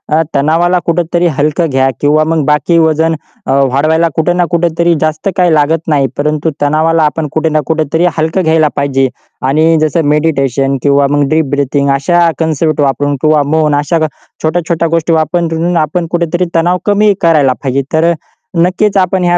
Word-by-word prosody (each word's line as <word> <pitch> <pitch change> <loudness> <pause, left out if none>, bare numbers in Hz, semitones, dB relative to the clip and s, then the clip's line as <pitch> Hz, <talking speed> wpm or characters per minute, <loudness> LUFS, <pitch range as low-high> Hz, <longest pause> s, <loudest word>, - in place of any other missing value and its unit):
अ, 160 - +3
तणावाला 165 +5 +2
कुठेतरी 175 +1 0
हलकं 155 +3 0
घ्या 135 0 +1
किंवा 150 +1 +3
मग 160 -1 0
बाकी 150 +3 +1
वजन 160 0 +1 0.3
अ, - - 0 0.2
वाढवायला 160 +5 +1
कुठे 165 +2 +1
ना 175 0 +1
कुठेतरी 170 0 +1
जास्त 155 +3 -2
काही 180 -3 +3
लागत 155 +2 +1
नाही, 145 -4 +1
परंतु 150 +2 -1
तणावाला 155 +2 +1
आपण 150 0 -1
कुठे 160 0 0
ना 155 - +1
कुठेतरी 160 +1 0
हलकं 160 +4 0
घ्यायला 160 -1 +2
पाहिजे. 135 -1 0 0.4
आणि 155 +4 +2
जसं 155 0 0
मेडिटेशन 135 -3 0
किंवा 140 0 +3
मग 145 -1 +1
डिप 160 0 +2
ब्रीथिंग 140 0 0
अशा 170 +5 +2
कन्सेप्ट 160 -1 -1
वापरून 140 +1 0
किंवा 155 -1 +3
मौन 150 -2 +2
अशा 150 +3 0 0.4
छोट्या-छोट्या 165 +1 -1
गोष्टी 165 0 0
वापरून 165 +2 0
आपण 165 +2 -1
कुठेतरी 175 +1 -1
तणाव 175 +2 +2
कमी 205 0 +3
करायला 150 -6 +3
पाहिजे. 135 +1 0
तर 165 +2 +2
अ, - - +1 0.5
नक्कीच 185 +4 +1
आपण 185 0 +1
ह्या 175 0 +2
160 Hz, 165 wpm, -11 LUFS, 145-170 Hz, 0.5 s, अ